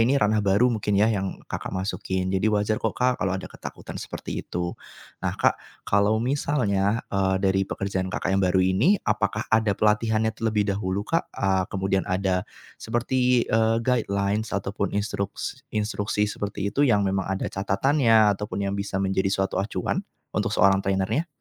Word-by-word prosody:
ini 125 +5 +4
ranah 105 -3 +2
baru 105 +5 +3
mungkin 105 -2 0
ya, 110 +3 +4
yang 95 -2 -2
Kakak - - -5
masukin. 95 -1 -2
Jadi 95 +3 +2
wajar 105 0 +1
kok, 110 - -2
Kak, 125 0 +1
kalau 95 -1 0
ada 95 - -7
ketakutan - - -8
seperti - - -5
itu. 85 0 -4 0.5
Nah, - - -2
Kak, - - +2 0.2
kalau 100 +2 +3
misalnya, 115 -5 0
eee, 95 -1 +2
dari 95 0 +3
pekerjaan 95 -1 -2
Kakak 95 - -2
yang 95 - +2
baru 95 0 +3
ini, 110 - +3
apakah 105 0 0
ada 110 -3 +3
pelatihannya 110 +1 +2
terlebih 110 -2 0
dahulu, 100 0 -2
Kak? 165 +6 -1
A 95 -1 +1
kemudian 95 -1 -1
ada 95 0 +1 0.4
seperti, 125 +1 +1
eee, 110 0 +2
guidelines 105 -3 0
ataupun 100 0 -2
instruks 100 -1 -3
instruksi 105 -1 -1
seperti 105 -1 -4 0.2
itu 140 - 0
yang 105 -4 +3
memang 95 -1 0
ada 95 0 -2
catatannya 110 +1 +3
ataupun 105 -1 -4
yang 100 0 -1
bisa 100 -1 -2
menjadi 95 0 +1
suatu 95 0 0
acuan 100 +2 -1 0.3
untuk - - -1
seorang 95 0 +5
trainer-nya? 95 - 0
100 Hz, 165 wpm, -25 LUFS, 95-110 Hz, 0.5 s, seorang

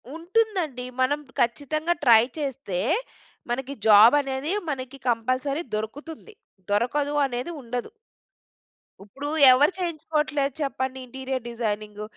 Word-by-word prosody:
ఉంటుందండి 350 - -1 0.2
మనం 285 +3 +2 0.2
ఖచ్చితంగా 305 +7 0
ట్రై 230 -3 +7 0.2
చేస్తే, 270 -10 -3 0.7
మనకి 265 +3 -3
జాబ్ 215 +5 +8
అనేది 270 +3 -3 0.2
మనకి 260 -1 -5
కంపల్సరీ 255 +6 0
దొరుకుతుంది. 290 - -7 0.4
దొరకదు 280 +7 0
అనేది 250 +5 -4
ఉండదు. 245 0 -5 1.1
ఇప్పుడు 275 +8 -8 0.2
ఎవరు 280 +6 +5
చేయించుకోవట్లేదు 305 -5 -1
చెప్పండి 265 -2 -2
ఇంటీరియర్ 260 0 -5
డిజైనింగ్? 215 -2 -4
265 Hz, 100 wpm, -25 LUFS, 240-295 Hz, 1.1 s, జాబ్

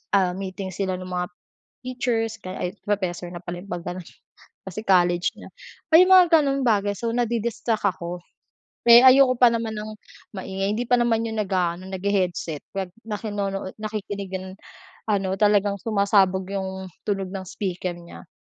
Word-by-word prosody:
ah, 185 -2 +3
meeting 190 0 -6
sila 190 -1 -2
ng 185 0 -8
mga 180 -1 -2 0.6
teachers 230 -3 -1 0.4
professor 185 -4 -2
na 175 - -8
pala 175 0 -6
yun 200 - -15
pag 175 -1 -4
ganon, 180 0 -5 0.6
kasi 190 +1 -6
college 175 -3 +3
na - - -12 0.4
may 345 +3 +9
mga 370 -2 +7
ganong 275 -2 0
bagay. 205 -3 +2
So 230 +3 -2
nadi-distract 235 -1 -1
ako, 180 -2 -2 0.7
eh, 235 0 +11
ayoko 260 0 +7
pa 245 - +7
naman 230 -1 -2
ng 210 +1 -5 0.5
maingay 195 +1 -2
hindi 230 - -1
pa 245 - +5
naman 230 -1 +2
yun 220 -1 -4
nag-aano 185 -2 -1
naghe-headset 185 -5 -1
kaya 195 -2 -2 0.2
nakinuno 205 -3 -3
nakikinig 205 -2 -5 0.8
ano 195 -2 +1
talagang 205 -1 +3
sumasabog 200 -3 +2
yung 190 -1 -4 0.2
tunog 195 -2 -1
ng 190 -1 -5
speaker 185 -2 -3
niya. 170 +1 -13
200 Hz, 145 wpm, -24 LUFS, 185-220 Hz, 0.8 s, eh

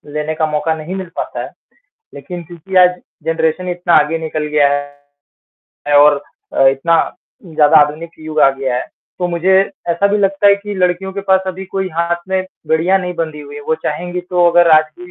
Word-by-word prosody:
लेने 150 +1 -2
का 160 -1 0
मौका 155 +2 0
नहीं 160 +4 -6
मिल 190 -2 -6
पाता - - -4
है। - - -7 0.7
लेकिन 170 +6 -8
क्योंकि 175 +3 -8
आज 180 0 +4 0.2
जनरेशन 165 +2 -1
इतना 175 -1 0
आगे 165 +2 -3
निकल 155 -1 -3
गया 145 -2 +5
है 145 0 -9 0.7
और 145 0 +6 0.4
अ, 135 - +4
इतना 135 +5 +1 0.5
ज़्यादा 155 -1 +3
आधुनिक 160 +3 -8
युग 155 0 -6
आ - - +7
गया 135 -2 -3
है, - - -3 0.3
तो 180 - 0
मुझे 175 +2 +1 0.4
ऐसा 170 +4 +2
भी 210 - +1
लगता 195 0 +1
है 200 - +6
कि 205 0 -7
लड़कियों 185 +1 -1
के 200 - -4
पास 190 0 +5
अभी 190 +1 -5
कोई 190 0 -3
हाथ 170 +1 0
में 190 0 0 0.2
बेड़िया 170 +4 +2
नहीं 180 -1 -4
बंधी 160 -3 -4
हुई 145 0 -11
है, - - -7
वो 160 - 0
चाहेंगी 175 +4 -3
तो 175 -1 +3
अगर 175 0 +4
आज 155 - +4
भी 360 0 -11
170 Hz, 200 wpm, -16 LUFS, 150-185 Hz, 0.7 s, आ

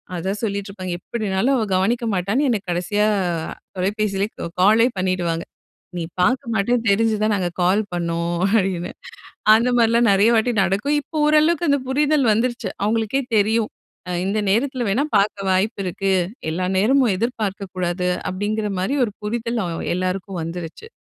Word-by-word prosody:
அத 185 +3 -2
சொல்லிட்டுருப்பாங்க 200 -3 -4
எப்படினாலும் 215 +4 -1
அவ 240 - +1
கவனிக்க 230 +6 +1
மாட்டான்னு 200 +10 0
என்ன 225 -4 +1
கடைசியா 180 +4 0 0.7
தொலைபேசிலேயே 200 +1 -1
க - - -3
காலே 215 +4 +5
பண்ணிடுவாங்க. 180 -3 -1 0.5
"நீ 170 - -2 0.2
பாக்க 250 +9 +2
மாட்டன்னு 225 +3 +1
தெரிஞ்சுதான் 215 +1 +2
நாங்க 180 -3 -1
கால் 190 +5 +3
பண்ணோம்" 170 0 -1 0.2
அப்டின்னு. 185 -2 -2 0.6
அந்த 230 +3 +3
மாரிலாம் 230 0 +4
நெறைய 200 +4 +4
வாட்டி 225 +2 +2
நடக்கும். 200 +10 +1
இப்போ 310 +2 -6
ஓரளவுக்கு 310 +3 +3
அந்த 280 -1 +2
புரிதல் 290 0 +2
வந்துருச்சு, 235 -1 -1
அவுங்களுக்கே 225 +5 0
தெரியும். 215 +1 +2 0.4
அ - - -2
"இந்த 205 +2 0
நேரத்துல 250 +3 0
வேணா 250 +9 +1
பாக்க 205 +1 +1
வாய்ப்பு 200 +3 0
இருக்கு, 195 +2 -1 0.4
எல்லா 180 +3 -1
நேரமும் 240 +1 +3
எதிர்பார்க்கக் 200 -3 -3
கூடாது." 180 0 -1 0.2
அப்டிங்கிற 210 +3 -2
மாரி 230 +10 -1
ஒரு 210 - -7
புரிதல் 230 +2 -2
அ - - -3 0.3
எல்லாருக்கும் 185 0 -3
வந்துருச்சு. 170 - -7
210 Hz, 145 wpm, -21 LUFS, 185-235 Hz, 0.7 s, காலே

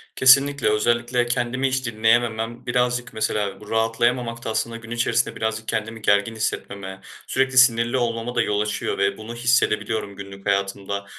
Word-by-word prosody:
Kesinlikle. 135 -1 +5
Özellikle 120 +3 +1
kendimi 125 +2 -1
hiç 130 0 -2
dinleyememem, 115 +1 0
birazcık 125 0 0
mesela 105 -2 -2
bu 105 - -13
rahatlayamamak 115 +1 0
da - - -2
aslında 115 +1 -2
gün 115 0 -12
içerisinde 120 +1 0
birazcık 110 0 -3
kendimi 110 0 -3
gergin 100 +2 +2
hissetmeme, 100 -3 -4 0.3
sürekli 135 -1 0
sinirli 120 0 +5
olmama 120 0 -2
da - - +3
yol 105 0 0
açıyor 105 -1 -2
ve 100 0 +1
bunu 110 +2 -8
hissedebiliyorum 115 -4 0
günlük 100 0 -10
hayatımda. 100 0 -1
115 Hz, 150 wpm, -23 LUFS, 105-120 Hz, 0.3 s, Kesinlikle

